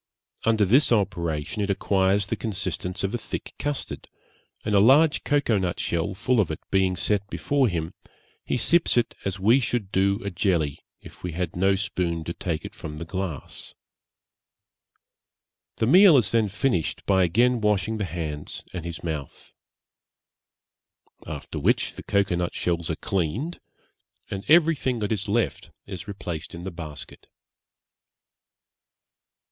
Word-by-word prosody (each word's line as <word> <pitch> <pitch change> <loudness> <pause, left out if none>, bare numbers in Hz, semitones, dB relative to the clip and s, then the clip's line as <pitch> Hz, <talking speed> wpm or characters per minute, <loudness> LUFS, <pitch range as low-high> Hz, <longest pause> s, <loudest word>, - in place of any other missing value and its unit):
Under 110 -2 +4
this 125 +10 +4
operation 85 -5 0
it 100 - -1
acquires 100 0 +2
the - - -2
consistence 100 -3 -3
of 100 +3 -1
a 120 - -1
thick - - -6
custard, 145 -1 -4 0.6
and 105 - 0
a 100 - +6
large 140 +9 +5
cocoa 145 -8 +2
nut 90 -2 -2
shell 85 +3 -1
full 125 +5 +1
of 100 - +2
it - - -4
being 95 -1 +2
set 100 +1 0
before 140 +3 +1
him, 85 -4 -3 0.5
he - - -1
sips 165 +4 +3
it 120 - +2
as 100 0 -2
we 115 +7 +5
should 115 -5 -2
do 100 +1 +2
a 100 - -3
jelly 85 -6 0 0.2
if - - -14
we 90 -2 -4
had 90 +2 -3
no 95 +2 +3
spoon 85 -4 -2
to 85 - -4
take 85 -4 -3
it - - -7
from 75 0 -8
the 85 - -5
glass. 90 -5 -6 2.0
The - - 0
meal 180 - +8
is 100 -7 +2
then 115 -2 +3
finished 100 - -1
by 95 -1 +3
again 120 +7 +3
washing 105 +1 +1
his 100 - -1
hands 75 -3 -5
and 90 -3 -4
his 85 -1 -6
mouth. 75 -4 -6 1.7
After - - -6
which - - +1
the - - -9
cocoa 100 -3 +1
nut 85 0 -2
shells 85 -1 -1
are 80 - 0
cleaned, 100 - -2 0.7
and 95 0 -4
everything 155 -6 +4
that 105 -1 -2
is 105 -1 -1
left 115 +2 0 0.2
is 95 -2 -7
replaced 90 -5 -6
in 85 - -8
the 95 - -4
basket.' 80 -4 -9
95 Hz, 150 wpm, -25 LUFS, 85-115 Hz, 2.0 s, meal